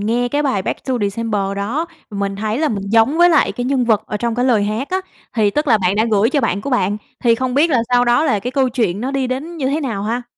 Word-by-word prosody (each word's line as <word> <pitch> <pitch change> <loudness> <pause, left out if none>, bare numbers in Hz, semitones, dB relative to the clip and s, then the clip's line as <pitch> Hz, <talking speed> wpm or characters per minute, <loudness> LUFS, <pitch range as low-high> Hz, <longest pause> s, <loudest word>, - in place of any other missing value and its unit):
nghe 235 +4 0
cái 290 +4 0
bài 205 -9 0
"Back - - -4
To 260 - -1
December" 205 0 -1
đó, 245 +12 -2 0.2
mình 200 -1 -3
thấy 215 +3 -2
là 310 0 +1
mình 200 -5 -3
giống 230 +7 +3
với 350 - +7
lại 310 - +3
cái 245 - -4
nhân 260 -1 +1
vật 220 -3 +2
ở 210 - -3
trong 235 +2 -2
cái 245 +2 0
lời 230 -6 +3
hát 215 +6 -3
á, 375 +1 0 0.3
thì 215 -3 +2
tức 300 +6 -1
là 225 - +5
bạn 185 0 0
đã 220 - +3
gửi 215 +3 +3
cho 290 - +1
bạn 200 - 0
của 280 - -5
bạn, 205 -5 +1 0.3
thì 230 - +5
không 255 +1 -2
biết 315 +4 +3
là 250 -5 +2
sau 245 0 +3
đó 245 +6 +3
là 260 -9 +2
cái 245 - -4
câu 260 0 +1
chuyện 220 -6 -1
nó 255 +3 -2
đi 270 -2 -1
đến 285 +7 -4
như 265 -4 -1
thế 300 +3 -1
nào 230 -8 -3
ha? 230 +4 -2
240 Hz, 290 wpm, -18 LUFS, 210-270 Hz, 0.3 s, với